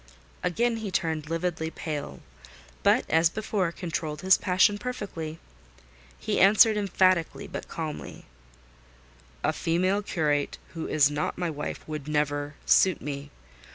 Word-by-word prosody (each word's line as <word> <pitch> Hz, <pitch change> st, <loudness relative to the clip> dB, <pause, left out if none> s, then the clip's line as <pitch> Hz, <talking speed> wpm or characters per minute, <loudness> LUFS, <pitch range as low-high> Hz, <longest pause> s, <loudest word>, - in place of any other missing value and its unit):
Again 235 Hz, +6 st, +1 dB
he 220 Hz, -2 st, -4 dB
turned 160 Hz, -4 st, -2 dB
lividly 165 Hz, -1 st, -2 dB
pale; 150 Hz, -3 st, -5 dB, 0.6 s
but, -, -, +3 dB
as 160 Hz, +1 st, +4 dB
before, 205 Hz, -3 st, -1 dB
controlled 160 Hz, -4 st, -4 dB
his 190 Hz, 0 st, +7 dB
passion 195 Hz, +2 st, +3 dB
perfectly. 200 Hz, -10 st, -5 dB, 0.8 s
He 215 Hz, -1 st, -1 dB
answered 215 Hz, +3 st, +6 dB
emphatically 185 Hz, -4 st, +1 dB
but -, -, -7 dB
calmly— 155 Hz, -2 st, -6 dB, 1.2 s
"A -, -, +2 dB
female 185 Hz, +5 st, +1 dB
curate, 150 Hz, -7 st, 0 dB, 0.2 s
who 165 Hz, -1 st, -4 dB
is 145 Hz, -1 st, +3 dB
not 145 Hz, +1 st, -2 dB
my 175 Hz, -2 st, -1 dB
wife, 150 Hz, -1 st, -6 dB
would 150 Hz, -2 st, -5 dB
never 145 Hz, -1 st, -1 dB
suit 185 Hz, -4 st, +4 dB
me. 145 Hz, 0 st, -6 dB
165 Hz, 125 wpm, -27 LUFS, 150-195 Hz, 1.2 s, his